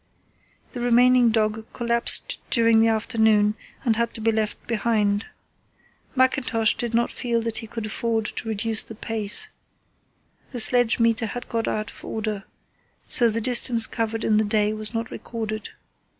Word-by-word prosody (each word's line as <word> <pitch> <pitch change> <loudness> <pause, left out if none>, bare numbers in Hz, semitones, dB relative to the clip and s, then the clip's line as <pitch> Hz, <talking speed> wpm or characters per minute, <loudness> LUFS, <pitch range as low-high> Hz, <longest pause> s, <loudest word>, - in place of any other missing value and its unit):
The 250 - -7
remaining 245 0 +4
dog 220 0 -1
collapsed 235 -1 +5
during 230 -2 +3
the 225 - +4
afternoon 220 -2 +2 0.3
and 225 -3 +1
had 235 0 -2
to - - -7
be 225 +1 +2
left 215 -1 -3
behind. 215 -3 0 0.9
Mackintosh 255 -4 +2
did 235 -1 -3
not 235 +1 +1
feel 235 -2 -2
that 230 -1 -1
he 225 - -6
could 225 0 -6
afford 225 0 -2
to 225 - -5
reduce 220 +1 +1
the 225 - -10
pace. 215 -1 -4 1.0
The 245 - -4
sledge 245 0 +4
meter, 230 0 +1
had 245 +4 -7
got 230 -1 -2
out 215 0 -3
of - - -16
order, 215 -2 -4 0.6
so 235 -2 +3
the 225 +1 -2
distance 240 -1 +3
covered 225 0 -3
in 215 - +2
the 215 - +2
day 210 0 0
was 215 0 -1
not 225 -1 -4
recorded. 220 -2 -6
225 Hz, 160 wpm, -23 LUFS, 215-235 Hz, 1.0 s, collapsed